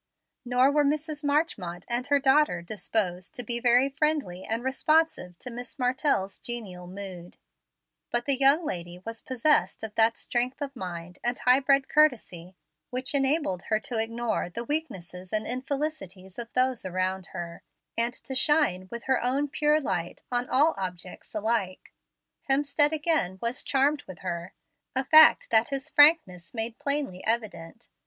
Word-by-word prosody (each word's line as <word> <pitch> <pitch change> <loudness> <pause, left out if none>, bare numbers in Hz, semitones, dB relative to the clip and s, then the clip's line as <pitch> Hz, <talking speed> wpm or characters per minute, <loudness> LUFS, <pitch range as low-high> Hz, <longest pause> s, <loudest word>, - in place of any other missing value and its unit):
Nor 250 +2 +3
were 295 0 +3
Mrs. 300 +1 -2
Marchmont 285 - -1
and 240 +2 -2
her 285 - +4
daughter 270 - +2
disposed 185 -1 -3
to 245 - -4
be 235 +1 -1
very 245 +2 +4
friendly 275 - -1
and 225 +2 -3
responsive 270 - +1
to 250 - -8
Miss 245 +3 -8
Martell's 250 -6 0
genial 195 -7 -7
mood; 185 -2 -9 0.7
but 240 0 -1
the 280 - +4
young 275 +5 +4
lady 175 -6 -5
was 225 0 -6
possessed 260 +1 +1
of 220 -1 -6
that 225 +1 +3
strength 250 +2 -1
of 280 -1 -5
mind 180 -3 -7
and 240 +1 0
high 250 +1 +4
bred 275 0 +2
courtesy 215 - +1 0.3
which 255 +2 -1
enabled 270 - +1
her 215 -1 +2
to 230 -1 -3
ignore 230 -3 -2
the 230 +6 -5
weaknesses 185 - -5
and 215 0 -1
infelicities 250 - -4
of 235 -1 -7
those 255 -1 +1
around 185 0 -2
her, 170 -2 -7 0.3
and 235 +2 -1
to 265 - -7
shine 265 - +2
with 235 0 -7
her 265 -1 +1
own 270 +4 0
pure 300 +1 +2
light 180 - -4
on 245 0 -1
all 300 +5 +4
objects 180 0 -7
alike. 215 -3 -2 0.6
Hemstead 290 +2 +3
again 300 - 0
was 235 +4 -2
charmed 285 +2 +1
with 185 - -11
her, 175 -1 -5 0.4
a 265 - +1
fact 315 +3 +7
that 225 0 +4
his 275 +2 -4
frankness 290 - +4
made 225 0 -4
plainly 280 -10 -2
evident. 215 -4 -3
240 Hz, 155 wpm, -27 LUFS, 185-280 Hz, 0.7 s, fact